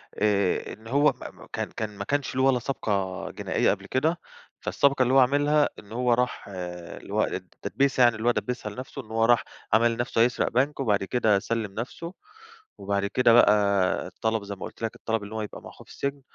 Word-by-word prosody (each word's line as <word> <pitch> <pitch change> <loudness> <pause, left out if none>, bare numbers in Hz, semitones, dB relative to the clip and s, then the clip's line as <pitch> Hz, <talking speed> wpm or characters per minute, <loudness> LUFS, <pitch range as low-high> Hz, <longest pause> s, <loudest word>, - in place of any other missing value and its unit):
آآ 100 -3 +1
إن 110 +2 -13
هو 145 +4 +4
ما - - -6
ما - - -15
كان - - -3
كان 105 -2 -5
ما 100 - -3
كانش 140 +1 -1
له 130 - +2
ولا 135 -2 +4
سابقة 100 -7 -2
جنائية - - +1
قبل - - -4
كده. 160 +6 0 0.4
فالسابقة 140 -2 +2
اللي 125 +1 +1
هو 135 - +7
عملها 145 +3 +3
إن 105 +1 -15
هو 125 +1 +2
راح 125 +1 -1
اللي 90 -3 -7
هو - - +3
التدبيسة 135 -2 0
يعنى 120 -1 +5
اللى 110 +2 -3
هو - - +6
دبِّسها 120 -3 -3
لنفسه، 130 +6 -7
إن 110 - -16
هو 115 0 +2
راح 120 0 +4 0.3
عمل 115 +1 +4
نفسه 120 -1 0
هيسرق 120 +1 +2
بنك، 135 +5 +1
وبعد 105 -7 +1
كده 110 -2 +2
سلِّم 110 -1 -3
نفسه 145 - -6 0.6
وبعد 100 0 -1
كده 120 +3 +3
بقى 100 -5 +3
طلب- 110 -1 0
زي 100 0 -5
ما 95 - -7
قلت - - -11
لَك- 115 - -2
الطلب 110 -2 -2
إن 100 - -9
هو 110 - -3
يبقى 105 - -7
مع - - -10
أخوه - - -15
في - - -17
السجن. 140 0 -4
115 Hz, 210 wpm, -26 LUFS, 105-130 Hz, 0.6 s, هو